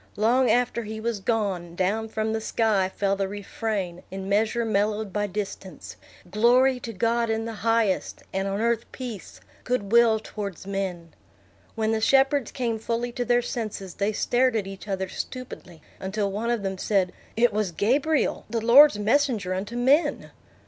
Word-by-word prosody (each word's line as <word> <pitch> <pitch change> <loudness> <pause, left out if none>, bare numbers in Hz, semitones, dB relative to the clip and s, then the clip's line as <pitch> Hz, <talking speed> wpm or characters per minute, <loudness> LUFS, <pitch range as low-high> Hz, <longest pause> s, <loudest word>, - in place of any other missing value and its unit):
Long 240 +4 +3
after 240 +1 +2
he 220 0 -6
was 230 -1 -2
gone, 190 -5 -2
down 210 +5 0
from 220 0 -2
the 220 - -2
sky 215 -4 +1
fell 195 0 0
the 195 0 -1
refrain 200 -2 -4
in 190 0 -6
measure 220 +3 +1
mellowed 210 -1 0
by 205 0 0
distance, 195 -3 -6 0.4
"Glory 250 +5 +4
to 230 - -6
God 230 +2 0
in 225 0 -1
the 230 - -5
highest, 225 -4 0
and 195 +1 -1
on 195 +1 -2
earth 235 0 0
peace, 240 -7 -8 0.2
good 245 -5 -2
will 235 -1 +5
towards 200 -4 -7
men." 190 -4 -4 0.6
When 220 -1 0
the 220 0 0
shepherds 270 +1 +3
came 235 -4 -2
fully 235 +2 -2
to 245 - -2
their 240 +1 +2
senses, 215 -6 -5
they 205 +1 0
stared 245 +3 +1
at 210 -3 0
each 195 +1 -9
other 190 -1 -2
stupidly, 185 - -8 0.2
until 200 +1 -2
one 220 +4 -2
of 235 -4 0
them 190 -1 -3
said, 190 -3 +1 0.2
"It 240 -1 +4
was 210 -3 0
Gabriel, 270 - +1
the 230 +1 -1
Lord's 275 +1 +8
messenger 220 -3 +1
unto 205 +5 -4
men." 270 +7 +2
220 Hz, 170 wpm, -25 LUFS, 195-235 Hz, 0.6 s, Lord's